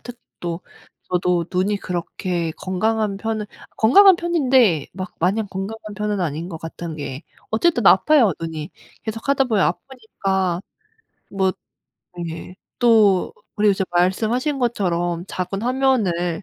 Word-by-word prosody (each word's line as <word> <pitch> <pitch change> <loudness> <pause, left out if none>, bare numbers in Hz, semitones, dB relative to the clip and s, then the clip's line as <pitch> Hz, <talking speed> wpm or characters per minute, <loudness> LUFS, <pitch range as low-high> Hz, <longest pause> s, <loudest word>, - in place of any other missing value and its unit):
특히 245 -1 -10 0.2
또 170 0 -4 0.5
저도 180 -1 +1
눈이 190 +3 +1
그렇게 175 -1 -3
건강한 210 +2 -1
편은 215 0 -3 0.3
건강한 380 - +7
편인데 260 - +2
막 185 0 -7
마냥 205 +5 +1
건강한 205 +3 -6
편은 210 -2 -1
아닌 165 +1 -3
것 165 - -6
같은 165 0 -7
게 140 0 -6 0.3
어쨌든 240 - +2
아파요 240 - +5
눈이. 160 -2 -5 0.3
계속하다 235 +5 0
보면 220 -6 +2
아프니까 190 -5 -2 0.7
뭐 190 -1 +1 0.8
네. 170 +3 -8 0.2
또 215 -6 +4 0.2
그리고 210 0 +3
이제 190 -1 0
말씀하신 225 - +1
것처럼 175 -7 -1
작은 185 +3 -3
화면을 215 -10 +1
195 Hz, 265 characters per minute, -21 LUFS, 175-225 Hz, 0.8 s, 건강한